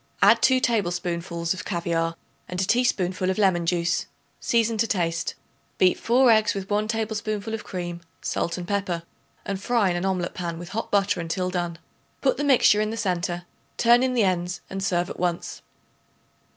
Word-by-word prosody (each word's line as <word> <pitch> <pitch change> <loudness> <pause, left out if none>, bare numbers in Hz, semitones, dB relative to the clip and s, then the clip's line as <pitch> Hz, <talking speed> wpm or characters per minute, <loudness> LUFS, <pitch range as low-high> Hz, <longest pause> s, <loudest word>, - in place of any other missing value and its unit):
Add - - +6
2 260 -1 +5
tablespoonfuls 175 -5 -1
of 185 - -7
caviare 165 -2 -1 0.3
and 180 - -4
a - - +2
teaspoonful 190 -5 +1
of 190 - 0
lemon 185 -5 +2
juice; 175 0 0 0.3
season 230 -1 +1
to 230 - +3
taste. 165 -5 -1 0.4
Beat 185 -1 +3
4 245 +1 +4
eggs 215 -2 +3
with 195 0 -5
1 210 +1 +1
tablespoonful 220 -1 -2
of 225 - -4
cream, 175 -2 -5 0.2
salt 170 +1 -2
and 175 -1 -6
pepper, 195 -4 -1 0.4
and 195 -1 -3
fry 225 -4 +2
in - - -1
an 175 - -2
omelet 185 -2 -1
pan 170 -2 -4
with 175 +1 -8
hot 225 - -4
butter 200 -3 +2
until 180 +2 -2
done. 175 -2 -2 0.4
Put 265 - +1
the 290 - -1
mixture 255 -6 +5
in 215 - 0
the 225 - -4
centre; 175 -3 -2 0.3
turn 240 +1 +5
in 255 -1 +1
the 235 - +3
ends 180 -1 -1
and 195 0 -3
serve 175 -2 +1
at - - -9
once. 175 -1 -2
185 Hz, 180 wpm, -25 LUFS, 175-215 Hz, 0.4 s, Add